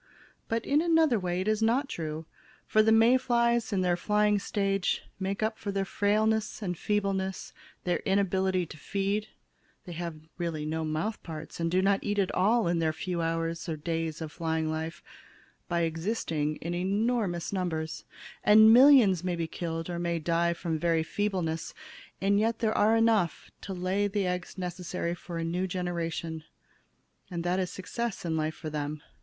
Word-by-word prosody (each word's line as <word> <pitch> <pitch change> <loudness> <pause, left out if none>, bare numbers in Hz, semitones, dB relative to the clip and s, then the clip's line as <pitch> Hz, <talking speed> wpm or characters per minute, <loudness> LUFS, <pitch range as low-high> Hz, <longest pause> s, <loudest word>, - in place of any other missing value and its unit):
But, 230 0 -1
in 290 +2 +3
another 325 -8 +3
way, 180 -1 -1
it 190 - -3
is 215 0 +1
not 245 +5 +2
true. 160 - -5 0.4
For 215 - +4
the 220 +1 +4
May 225 +3 +6
flies, 235 -2 +1
in 195 -2 +1
their 180 -1 +2
flying 210 +2 +2
stage, 195 -1 0 0.2
make 195 +2 -2
up 220 0 -1
for 200 - -3
their 195 0 -1
frailness 215 +2 +1
and 180 -2 -2
feebleness, 195 0 -2 0.3
their 180 - 0
inability 190 -2 +1
to 155 - -11
feed 200 +5 -1 0.6
they 180 - -8
have 170 -1 -4 0.2
really 165 -3 -2
no 160 +1 -2
mouth 155 +8 -2
parts 160 -1 -8
and 165 0 0
do 185 +2 +2
not 195 0 +3
eat 205 0 -2
at 195 -2 +1
all 215 +3 +3
in 170 0 +1
their 160 -1 +1
few 170 +2 -3
hours 165 +1 -2
or 160 - -2
days 165 +1 -3
of 155 -2 -5
flying 160 -1 -1
life 160 +1 -4 0.6
by 170 -1 0
existing 165 -3 -1
in 170 +3 -5
enormous 200 0 0
numbers, 160 -4 -2 0.4
and 220 +1 +8
millions 240 - +7
may 180 -1 -1
be 170 -1 -2
killed, 165 0 -4
or 175 -1 -4
may 170 -1 0
die 170 +1 +1
from 170 -2 -3
very 165 -1 +2
feebleness, 175 -4 -2 0.4
and 200 +1 +3
yet 225 +1 +1
there 220 -2 0
are 215 +2 +4
enough 225 -7 +2
left - - -43
to - - -7
lay 185 +3 0
the 200 -1 -1
eggs 180 +1 -3
necessary 180 -1 -3
for 175 0 -7
a 165 - -2
new 175 +3 -1
generation, 170 -3 -3 0.9
and 170 -3 -4
that 180 +2 +1
is 185 -1 -1
success 195 +4 -4
in 165 -1 -1
life 155 0 -1
for 155 -1 -6
them. 150 0 -4
180 Hz, 180 wpm, -29 LUFS, 165-210 Hz, 0.9 s, and